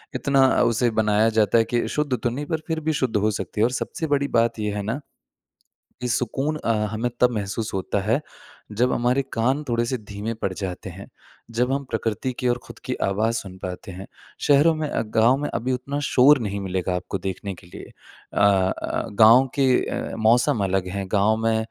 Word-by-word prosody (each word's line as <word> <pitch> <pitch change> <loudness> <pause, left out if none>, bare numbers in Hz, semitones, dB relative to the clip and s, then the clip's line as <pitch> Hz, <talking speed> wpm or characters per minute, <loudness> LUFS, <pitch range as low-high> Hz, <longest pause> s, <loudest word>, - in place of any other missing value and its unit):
इतना 135 -2 +3 0.2
उसे 120 0 +2
बनाया 105 +1 +3
जाता 110 0 +3
है 115 - +5
कि 120 - +1
शुद्ध 150 -3 -1
तो 120 - -1
नहीं 140 +5 -4
पर 160 0 -2
फिर 160 -1 -1
भी 160 0 -1
शुद्ध 130 -5 -1
हो 105 +1 +2
सकती 105 +1 -4
है। - - +6
और 125 - 0
सबसे 160 +5 -3
बड़ी 140 -1 +1
बात 115 -1 +1
ये 105 -1 -1
है 105 - -2
ना, 115 +7 -2 1.0
कि 125 - -2
सुकून 135 +5 -1
अ, 115 - -1 0.2
हमें 115 +3 -1
तब 125 0 +4
महसूस 105 0 -3
होता 95 +1 -1
है, 115 +9 +1 0.5
जब 125 +4 +1
हमारे 125 +3 +1
कान 130 +6 +1
थोड़े 120 0 +1
से 130 +1 -2
धीमे 105 +1 -5
पड़ 110 -3 -3
जाते 95 -2 -5
हैं, - - -10 0.4
जब 125 +3 0
हम 140 +1 -1
प्रकृति 115 +4 -2
की 125 - 0
ओर 120 - +1
खुद - - -12
की - - -1
आवाज़ 110 +4 0
सुन 95 -2 -11
पाते 90 +1 -6
हैं। 95 +2 -9 0.4
शहरों 145 +3 +5
में 155 -1 -2
अ, - - -1
गाँव 115 +3 +3
में 145 - -3
अभी 125 +2 -1
उतना 140 +3 -3
शोर 135 +3 +6
नहीं 100 -3 -3
मिलेगा 95 -1 -2
आपको 90 +2 -3
देखने 95 +1 -5
के 85 +1 -16
लिए। - - -11 0.4
अ, - - -1
अ, 95 -2 +1
गाँव 120 +5 +7
के 140 - +3 0.2
अ, - - -4
मौसम 110 -1 +3
अलग 95 -1 0
हैं। 100 -1 -3
गाँव 105 +2 +3
में 115 0 +2
115 Hz, 205 wpm, -23 LUFS, 100-130 Hz, 1.0 s, गाँव